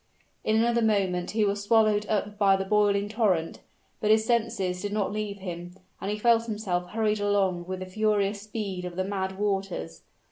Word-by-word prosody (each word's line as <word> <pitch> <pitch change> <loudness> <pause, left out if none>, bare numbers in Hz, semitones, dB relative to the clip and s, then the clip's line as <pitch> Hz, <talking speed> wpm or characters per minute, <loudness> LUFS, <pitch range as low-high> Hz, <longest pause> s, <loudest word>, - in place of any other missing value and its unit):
In 215 - +1
another 235 +1 +3
moment 195 -5 +1
he 215 -1 +1
was 200 0 0
swallowed 210 -1 +3
up 205 -1 -1
by 195 -2 +5
the 195 0 -2
boiling 205 0 +2
torrent; 205 -7 0 0.4
but 210 - 0
his 220 0 +4
senses 195 -6 0
did 205 - -3
not 205 -2 0
leave 210 -1 -3
him, 175 -2 -7 0.3
and 195 - -3
he 210 - -1
felt 230 +1 +3
himself 190 -5 -2
hurried 215 0 0
along 195 -4 +1
with 185 0 -4
the - - -4
furious 205 +1 0
speed 205 -3 -5
of 180 -1 -6
the 185 - 0
mad 190 -1 -3
waters. 195 - -2
205 Hz, 185 wpm, -27 LUFS, 185-215 Hz, 0.4 s, by